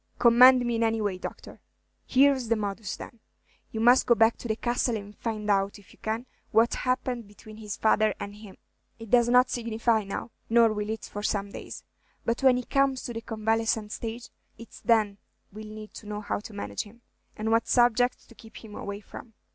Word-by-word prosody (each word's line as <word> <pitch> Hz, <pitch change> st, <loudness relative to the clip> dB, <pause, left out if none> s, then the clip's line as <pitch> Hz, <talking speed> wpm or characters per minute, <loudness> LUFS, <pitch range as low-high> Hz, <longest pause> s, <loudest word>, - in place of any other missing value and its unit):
"Command 250 Hz, +1 st, +7 dB
me 240 Hz, -, 0 dB
in -, -, -1 dB
any 225 Hz, 0 st, +1 dB
way, 205 Hz, -3 st, -1 dB
Doctor." -, -, -8 dB, 0.5 s
"Here's 265 Hz, -2 st, +4 dB
the 230 Hz, -, +2 dB
modus, 205 Hz, -1 st, -4 dB
then. 235 Hz, -, -11 dB, 0.5 s
You 220 Hz, -, -4 dB
must 245 Hz, +3 st, +5 dB
go 235 Hz, -, +6 dB
back 225 Hz, 0 st, +4 dB
to -, -, -7 dB
the 220 Hz, -, 0 dB
Castle 240 Hz, 0 st, 0 dB
and 205 Hz, 0 st, -10 dB
find 215 Hz, -2 st, -4 dB
out, 200 Hz, -1 st, +1 dB
if 205 Hz, -, -18 dB
you -, -, -23 dB
can, 220 Hz, +3 st, -3 dB, 0.2 s
what 230 Hz, +1 st, +3 dB
happened 255 Hz, -3 st, -2 dB
between 215 Hz, +1 st, -14 dB
his 210 Hz, -2 st, -6 dB
father 215 Hz, 0 st, +3 dB
and 200 Hz, -, -6 dB
him. 210 Hz, -3 st, -13 dB, 0.4 s
It 225 Hz, -2 st, -11 dB
does 240 Hz, -1 st, +5 dB
not 250 Hz, +1 st, +5 dB
signify 230 Hz, -1 st, 0 dB
now, 195 Hz, +4 st, -6 dB, 0.2 s
nor 230 Hz, -1 st, +5 dB
will 210 Hz, 0 st, -3 dB
it 220 Hz, -1 st, -4 dB
for 205 Hz, -, -7 dB
some 200 Hz, -1 st, -1 dB
days; -, -, -8 dB, 0.4 s
but 230 Hz, +3 st, -1 dB
when 260 Hz, -2 st, +5 dB
he 250 Hz, -, -3 dB
comes 275 Hz, 0 st, +1 dB
to 240 Hz, -, -5 dB
the 225 Hz, -, -5 dB
convalescent 225 Hz, -1 st, -1 dB
stage, 230 Hz, +2 st, -6 dB, 0.3 s
it's 230 Hz, -, -13 dB
then 215 Hz, -3 st, +2 dB, 0.3 s
we 215 Hz, -, -8 dB
'll -, -, -8 dB
need 215 Hz, 0 st, -10 dB
to 210 Hz, -, -11 dB
know 210 Hz, 0 st, -4 dB
how 205 Hz, -, -2 dB
to 215 Hz, -, -10 dB
manage 105 Hz, -, -4 dB
him, 230 Hz, +3 st, -14 dB, 0.3 s
and 220 Hz, +1 st, -2 dB
what 230 Hz, 0 st, +2 dB
subjects 245 Hz, 0 st, +3 dB
to -, -, -17 dB
keep 225 Hz, 0 st, -14 dB
him 210 Hz, -, -11 dB
away 200 Hz, 0 st, -6 dB
from. 225 Hz, +1 st, -12 dB
225 Hz, 210 wpm, -27 LUFS, 210-240 Hz, 0.5 s, Command